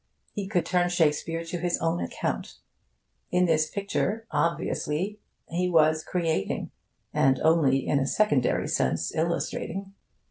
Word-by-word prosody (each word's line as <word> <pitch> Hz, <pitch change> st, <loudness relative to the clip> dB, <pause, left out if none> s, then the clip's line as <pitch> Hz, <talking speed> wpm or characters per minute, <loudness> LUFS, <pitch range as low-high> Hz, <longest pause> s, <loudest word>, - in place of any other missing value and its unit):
He 200 Hz, -2 st, -4 dB
could 185 Hz, -4 st, 0 dB
turn 180 Hz, -1 st, +2 dB
Shakespeare 165 Hz, 0 st, +1 dB
to 175 Hz, +1 st, -4 dB
his 175 Hz, 0 st, 0 dB
own 165 Hz, +1 st, 0 dB
account. -, -, -3 dB, 0.7 s
In 180 Hz, 0 st, +3 dB
this 155 Hz, -2 st, +2 dB
picture, 200 Hz, +2 st, -2 dB
obviously, 170 Hz, +3 st, -1 dB, 0.3 s
he 180 Hz, +2 st, -1 dB
was 155 Hz, -2 st, +4 dB
creating, 165 Hz, -, -1 dB, 0.4 s
and 130 Hz, -1 st, +3 dB
only 150 Hz, -5 st, +3 dB
in 140 Hz, -, +2 dB
a 135 Hz, -, 0 dB
secondary 145 Hz, -12 st, +2 dB
sense 65 Hz, -, 0 dB
illustrating. 170 Hz, +3 st, -2 dB
170 Hz, 130 wpm, -27 LUFS, 155-180 Hz, 0.7 s, was